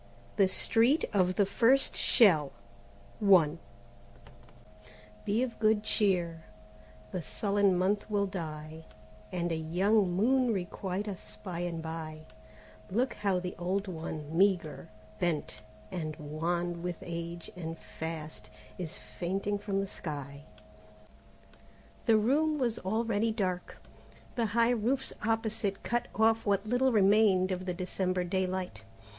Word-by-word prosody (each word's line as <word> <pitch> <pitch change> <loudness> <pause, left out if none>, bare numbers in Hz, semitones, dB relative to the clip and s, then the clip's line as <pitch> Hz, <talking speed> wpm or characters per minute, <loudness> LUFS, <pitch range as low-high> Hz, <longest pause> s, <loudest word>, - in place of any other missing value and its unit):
THE 195 -2 +5
STREET 230 +9 +3
OF 185 -2 +2
THE 200 - +4
FIRST 245 +7 +3
SHELL 160 - +4 2.7
"Be 220 +5 +2
of 240 -3 -5
Good 215 -1 +3
Cheer, 175 -7 +1 0.7
the 185 - -3
Sullen 200 +1 +1
Month 200 +4 0
will 205 -1 +1
die, 160 -4 -6 0.5
And 175 -1 -1
a - - +1
young 185 +6 +2
Moon 250 +6 +3
requite 190 +1 -3
us 105 - -8
by 170 -1 -4
and 170 -2 -3
by: 160 -1 -6 0.6
Look 240 +6 +1
how 200 -3 0
the 180 0 -4
Old 190 +3 -1
one, 160 -3 -5
meagre, 180 -4 +2 0.3
bent, 150 -10 -1 0.3
and 155 -3 -4
wan 170 +3 -2
With 175 -1 -3
age 170 0 -6
and 165 -2 -5
Fast, 160 -1 -7 0.3
is 165 -3 -4
fainting 195 +3 -3
from 200 -1 -1
the - - -2
sky." 145 -4 -7 1.6
The 225 - +6
room 300 +8 +2
was 240 -5 0
already 220 +2 0
dark. 185 -4 -2 0.6
The 235 -2 0
high 235 +1 +5
roofs 245 +3 0
opposite 220 -2 -1
cut 240 0 -1
off 225 +1 +3
what 200 0 +1
little 245 +4 +2
remained 200 -3 +4
of 185 0 -3
the 180 - 0
December 185 0 -1
daylight. 185 - -2
190 Hz, 125 wpm, -31 LUFS, 170-215 Hz, 2.7 s, The